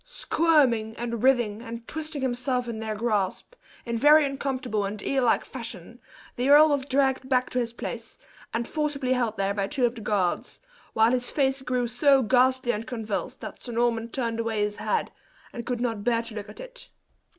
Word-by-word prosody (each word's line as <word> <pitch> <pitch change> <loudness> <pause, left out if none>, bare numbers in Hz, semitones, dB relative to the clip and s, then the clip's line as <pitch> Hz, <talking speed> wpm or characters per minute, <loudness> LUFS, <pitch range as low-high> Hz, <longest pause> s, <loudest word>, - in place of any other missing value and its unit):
Squirming, 300 - +2
and 235 -1 -3
writhing, 240 -5 +2
and 230 -1 -8
twisting 310 -3 -4
himself 250 0 -1
in 230 -2 -4
their 220 -1 -3
grasp, 210 - -1 0.3
in 235 -1 -2
very 295 +3 +7
uncomfortable 265 -5 -2
and 200 +2 -4
eel 270 -2 +1
like 235 - +2
fashion, 230 -3 -8 0.4
the 250 +3 0
earl 300 +2 +8
was 285 -2 0
dragged 265 -1 +1
back 255 -1 +1
to 250 - 0
his 235 -1 -2
place, 235 - -6 0.3
and 235 +1 -2
forcibly 290 -4 -1
held 235 -4 -1
there 195 0 0
by 200 -1 -1
two 260 +2 +1
of 235 - 0
the 235 - -9
guards, 200 -4 -1 0.3
while 225 +1 +4
his 250 -1 0
face 270 -2 +1
grew 255 -1 -1
so 265 +3 +3
ghastly 255 +1 +3
and 220 +1 -4
convulsed 220 -4 -4
that - - -8
Sir 240 - -6
Norman 230 -1 0
turned 230 -2 -2
away 225 -2 0
his 210 0 -2
head, - - -1 0.4
and 235 - -7
could 245 -2 -1
not 230 -4 -2
bear 230 0 +1
to 230 - -9
look 210 -1 -7
at 210 - -12
it. - - -11
240 Hz, 195 wpm, -26 LUFS, 225-265 Hz, 0.4 s, earl